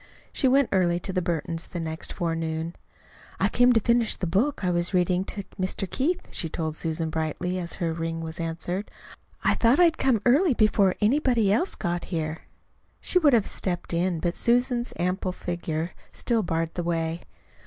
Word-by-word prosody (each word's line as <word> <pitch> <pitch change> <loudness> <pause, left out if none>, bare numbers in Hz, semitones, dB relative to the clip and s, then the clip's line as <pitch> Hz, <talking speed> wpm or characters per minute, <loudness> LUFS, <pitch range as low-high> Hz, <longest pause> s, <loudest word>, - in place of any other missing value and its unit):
She 270 - +2
went 270 0 +4
early 175 -2 +2
to 190 +2 -4
the 185 - +1
Burtons' 170 -1 -3
the 175 - -6
next 160 -1 -4
forenoon. 165 0 -2 0.6
"I - - +2
came 245 0 +4
to 225 - +4
finish 235 +1 +2
the 185 - -2
book 205 - 0
I 180 - +2
was 175 +2 +1
reading 180 +1 +2
to 200 - -3 0.2
Mr. 185 +1 -1
Keith," 345 - -1
she 165 - -1
told 160 -1 -3
Susan 160 0 -1
brightly, 160 +3 -2
as 170 -2 -1
her 170 -3 -1
ring 165 0 -3
was 160 0 -6
answered. 170 +4 -3 0.5
"I - - +4
thought 240 +6 +3
I'd 335 -2 +4
come 260 -4 +3
early 280 +4 +4
before 205 -4 +3
anybody 230 -3 +3
else 300 - 0
got 175 0 -2
here." 160 -2 -4 0.5
She 360 - +2
would 295 -5 +4
have 225 -4 +4
stepped 175 -2 -2
in, 175 0 0
but 170 +1 -1
Susan's 245 +2 +2
ample 180 +2 -1
figure 170 -2 -3 0.2
still 235 -2 0
barred 165 -3 -2
the 180 - -3
way. 165 -1 -2
180 Hz, 180 wpm, -26 LUFS, 165-230 Hz, 0.6 s, went